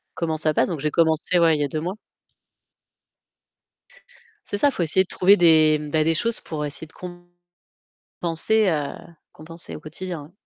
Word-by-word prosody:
comment 160 -2 -2
ça 155 0 0
passe». - - +2
Donc 165 -4 -4
j'ai 150 +2 -1
commencé 165 +1 +2
ouais, 165 -2 +4
il - - -3
y - - +2
a - - 0
2 155 +3 -4
mois. 180 +3 -3 2.6
C'est 205 - -3
ça, 285 - +4
faut 185 -10 -2
essayer 180 +4 +2
de 185 - -12
trouver 195 +3 +4
des 155 -3 +5
ben 155 +1 -1
des 165 - +1
choses 230 +7 -1
pour 150 -2 -5
essayer 145 +2 -6
de 160 - -14 1.1
compenser, 185 +5 0
heu, 150 -3 -2 0.4
compenser 165 +2 -7
au - - -8
quotidien. 160 0 -8
160 Hz, 170 wpm, -23 LUFS, 155-180 Hz, 2.6 s, des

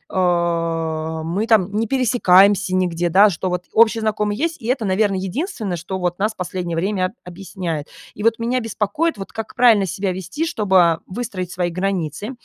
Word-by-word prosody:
а, 165 -3 0
мы 190 +8 -2
там 205 -4 +3
не 220 +1 0
пересекаемся 200 -6 +4
нигде, 175 -2 0
да, 200 +4 +6
что 180 +2 -3
вот 180 0 -3
общие 225 0 +4
знакомые 210 -1 -1
есть, 330 -1 -2
и 225 - -7
это, 250 -3 0
наверно, 195 +1 +1
единственное, 195 - -3
что 190 +4 -5
вот 175 0 -2
нас 215 +2 0
последнее 180 -2 -4
время 190 +1 -1
объясняет. 175 -4 -5 0.3
И 210 - -9
вот 230 0 +3
меня 245 +2 0
беспокоит, 225 +7 -1
вот 195 - -8
как 225 -1 -7
правильно 225 -6 +5
себя 190 +2 -2
вести, 190 - -4
чтобы 190 - +3
выстроить 185 -4 -5
свои 175 -1 -1
границы, 185 - -3
190 Hz, 170 wpm, -20 LUFS, 175-220 Hz, 0.3 s, да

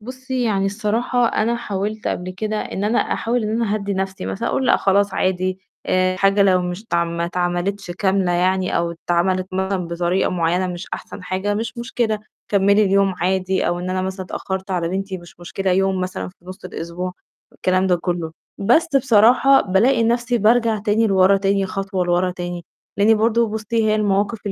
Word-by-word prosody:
بُصّي، 255 +2 -4
يعني 195 -3 +1
الصراحة 225 +4 0
أنا 230 +2 0
حاولت 210 -1 -3
قبل 180 +1 -3
كده 215 +3 -3
إن 200 - -4
أنا 220 +3 +2
أحاول 235 0 0
إن 215 - -2
أنا 210 -1 0
أهدّي 200 -1 -2
نفسي 190 - -3
مثلًا 95 0 -2
أقول 265 - 0
لأ - - +5
خلاص 200 0 +2
عادي، 185 0 0 0.3
آآ، 185 0 +2
الحاجة 195 +2 +3
لو 185 -2 +3
مش 180 +3 -4
اتعم 170 -5 -1
ما 170 - -1
اتعملتش 175 +2 -2
كاملة 190 0 +1
يعني 185 +1 +1
أو 170 0 0 0.2
اتعَملِت 185 +2 +1
مثلًا 190 -1 -1
بطريقة 175 +2 0
معيّنة 180 +1 0
مش 180 +1 -6
أحسن 200 - -9
حاجة 190 +3 -2
مش 230 +3 -4
مشكلة، 235 -3 -1 0.3
كمّلي 200 +1 +4
اليوم 195 0 +2
عادي 190 +1 0
أو 175 - 0
إن 180 +1 -4
أنا 185 0 -1
مثلًا 190 0 -4
اتأخّرت 190 +1 -5
على 170 -2 -1
بنتي 190 0 -3
مش 175 0 -16
مشكلة 190 +2 -3
يوم 190 0 +1
مثلًا 185 0 -4
في 185 - -17
نُصّ 185 +3 -10
الأسبوع، 175 +2 -5 0.4
والكلام 185 +1 +1
ده 180 -2 +3
كُلّه. 170 -2 -3 0.3
بس 245 +12 +3
بصراحة 250 +2 +5
بالاقي 230 +6 +2
نفسي 240 +1 +1
بارجع 225 +1 +3
تاني 215 +2 +1
لورا 195 0 +4
تاني 195 0 +1
خطوة 195 -1 -2
لورا 175 +1 +1
تاني، 175 -1 -6 0.3
لأني 215 +2 +5
برضه 230 +1 +2
بُصّي 220 +1 -1
هي 215 - +2
المواقف 205 +1 +1
195 Hz, 180 wpm, -20 LUFS, 185-215 Hz, 0.4 s, لأ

